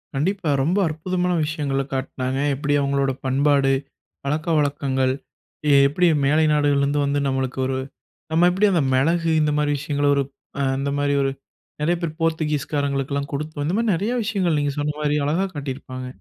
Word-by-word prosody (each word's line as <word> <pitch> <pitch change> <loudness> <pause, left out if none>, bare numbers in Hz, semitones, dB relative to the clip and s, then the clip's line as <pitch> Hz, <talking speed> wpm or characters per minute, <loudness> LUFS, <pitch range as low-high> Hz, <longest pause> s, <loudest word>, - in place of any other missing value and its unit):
கண்டிப்பா. 175 +4 -1
ரொம்ப 170 +7 +1
அற்புதமான 180 +3 -1
விஷயங்கள 145 -3 -1
காட்னாங்க. 130 0 -2 0.2
எப்படி 145 +2 -1
அவங்களோட 140 -1 +1
பண்பாடு, 135 +1 +3 0.5
பழக்கவழக்கங்கள் 145 -4 0 0.6
எ - - +6
எப்படி 175 +6 +2 0.2
மேலை 155 +3 +3
நாடுகள்லருந்து 145 -1 +2
வந்து 140 +1 0
நம்மளுக்கு 130 -1 -2
ஒரு 130 0 -1 0.5
நம்ம 165 +2 +4
எப்படி 190 +4 +2
அந்த 175 -4 +2
மிளகு 165 +6 +2
இந்த 150 0 +2
மாரி 150 0 +1
விஷயங்களை 145 0 -1
ஒரு 140 - +2 0.4
அ - - +1 0.2
அந்த 140 +1 -1
மாதிரி 145 0 +1
ஒரு 135 - +1 0.5
நெறைய 170 +4 +2
பேர் 160 -2 -4
போர்த்துகீஸ் 160 -3 -1
காரங்களுக்கெல்லாம் 140 0 -1
கொடுத்தோம். 150 +1 -3
இந்த 170 +5 0
மாரி 230 -1 +2
நெறைய 205 +8 -1
விஷயங்கள் 190 -7 0
நீங்க 145 -1 -1
சொன்ன 150 0 -1
மாரி 150 0 +1
அழகா 165 +7 +1
காட்டியிருப்பாங்க. 130 -2 -6
145 Hz, 155 wpm, -22 LUFS, 140-160 Hz, 0.6 s, எ